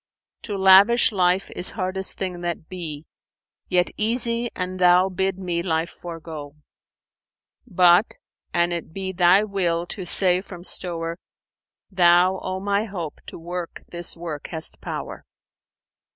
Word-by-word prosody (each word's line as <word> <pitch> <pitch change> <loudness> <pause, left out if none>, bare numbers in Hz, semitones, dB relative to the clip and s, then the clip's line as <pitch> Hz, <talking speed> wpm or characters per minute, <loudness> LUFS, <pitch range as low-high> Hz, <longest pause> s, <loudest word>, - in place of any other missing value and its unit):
To 205 -3 -5
lavish 195 +6 +6
life 185 -1 +1
is 180 - -1
hardest 190 0 +1
thing 180 -2 -4
that 170 -2 -4
be, 160 -5 -7 0.3
* - - -52
Yet 180 0 +2
easy 235 +1 0
an 185 0 -4
Thou 180 +1 +5
bid 190 0 -1
me 175 -3 -2
life 165 -1 -1
forego; 160 -4 -9 1.1
But, 180 0 +4 0.4
an 175 0 +1
it 170 -2 -4
be 190 0 -4
Thy 180 +2 +4
will 175 -5 -1
to 185 +2 -5
save 185 0 +3
from 180 -3 -11
stowre, 170 -2 -1 0.4
* - - -70 0.3
Thou, 180 0 +4
O 185 0 -4
my 200 +2 0
Hope, 175 -7 -6
to - - -8
work 175 +1 -6
this 175 0 -4
work 165 -4 -6
hast 160 -2 -7
power!'" - - -6
180 Hz, 140 wpm, -23 LUFS, 170-190 Hz, 1.1 s, lavish